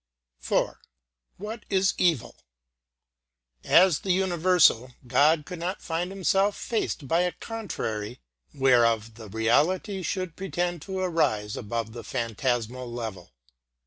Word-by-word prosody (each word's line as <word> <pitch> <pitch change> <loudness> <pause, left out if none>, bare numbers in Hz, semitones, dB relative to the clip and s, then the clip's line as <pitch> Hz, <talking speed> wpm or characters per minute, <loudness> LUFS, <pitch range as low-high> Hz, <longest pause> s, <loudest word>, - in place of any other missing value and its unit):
IV. - - +1 0.7
What 215 +2 -7
is 190 -1 +2
Evil? 165 -9 +1 1.3
As 180 -4 +5
the 190 - -1
universal, 175 -9 +3
God 150 +5 +3
could 180 0 -7
not 180 +4 -3
find 170 +1 -2
Himself 195 +1 +1
faced 210 - -2
by 165 +5 +2
a 180 0 0
contrary 115 - -5 0.3
whereof 115 -5 +3
the 110 -1 -11
reality 155 - +1
should 185 -1 -3
pretend 175 -3 -2
to 190 +3 -5
rise 110 - 0
above 110 +1 -4
the 120 -1 -8
phantasmal 120 +1 -2
level. 110 - -6
160 Hz, 115 wpm, -26 LUFS, 115-185 Hz, 1.3 s, As